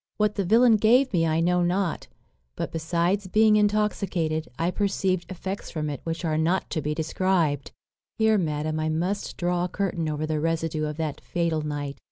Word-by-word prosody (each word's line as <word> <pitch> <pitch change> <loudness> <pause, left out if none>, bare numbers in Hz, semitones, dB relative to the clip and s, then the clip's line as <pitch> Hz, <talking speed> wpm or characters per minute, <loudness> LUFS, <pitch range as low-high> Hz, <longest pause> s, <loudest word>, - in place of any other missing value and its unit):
What 210 -1 +2
the 200 - -1
villain 225 +4 +5
gave 245 +4 +4
me 165 -2 +2
I 160 +1 +1
know 180 +1 +2
not; 175 0 0 0.5
but, - - -4
besides 170 +4 0
being 215 +3 +4
intoxicated, 205 -6 0
I 170 +2 0
perceived 190 -3 -1
effects 190 +1 -5
from 150 -2 -3
it 140 - -5
which 165 +1 -3
are 155 -1 0
not 170 +4 0
to 160 - -1
be 150 +1 -2
described. 160 -2 0 0.5
"Here, 220 -1 +3
madam, 155 -2 -1
I 155 0 0
must 180 +6 -2
draw 175 0 0
a - - -4
curtain 175 -4 -2
over 150 0 -2
the 155 -1 -1
residue 165 -1 -1
of 150 0 -4
that 155 -3 -3
fatal 170 -3 -1
night. 145 -2 -4
170 Hz, 185 wpm, -25 LUFS, 155-195 Hz, 0.5 s, villain